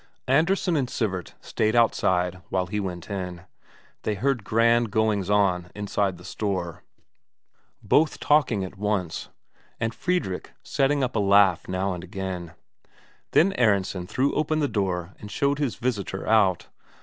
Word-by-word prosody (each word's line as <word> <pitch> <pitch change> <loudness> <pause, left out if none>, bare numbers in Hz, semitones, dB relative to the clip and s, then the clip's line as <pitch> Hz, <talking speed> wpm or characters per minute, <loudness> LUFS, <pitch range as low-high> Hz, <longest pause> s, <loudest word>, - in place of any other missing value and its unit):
Andresen 170 +6 +2
and 135 -5 0
Sivert 95 -8 -3
stayed 110 +1 0
outside 90 -6 +2
while 95 -1 0
he 105 +4 -3
went 90 -3 -5
in. 90 -3 -5 0.6
They 105 - -1
heard 125 +1 0
grand 115 +2 +3
goings 105 -2 +1
on 95 -4 +2
inside 100 -2 -1
the 90 - -14
store, 95 -4 -3 1.0
both 155 +1 +2
talking 135 -9 +2
at 95 +1 -8
once, 100 -5 -2 0.5
and 115 0 -1
Fredrik 175 - -2
setting 140 0 +1
up 125 - -2
a - - +2
laugh 100 -3 +4
now 95 +1 -1
and 90 -1 -7
again; 95 -2 -5 0.8
then 195 +5 +5
Aronsen 100 -5 +1
threw 130 +7 0
open 155 +1 0
the 150 -2 +1
door 95 -5 -2
and 105 - -9
showed 140 +6 0
his 135 -9 -1
visitor 105 -6 -3
out. 100 -5 +3
105 Hz, 145 wpm, -25 LUFS, 95-125 Hz, 1.0 s, then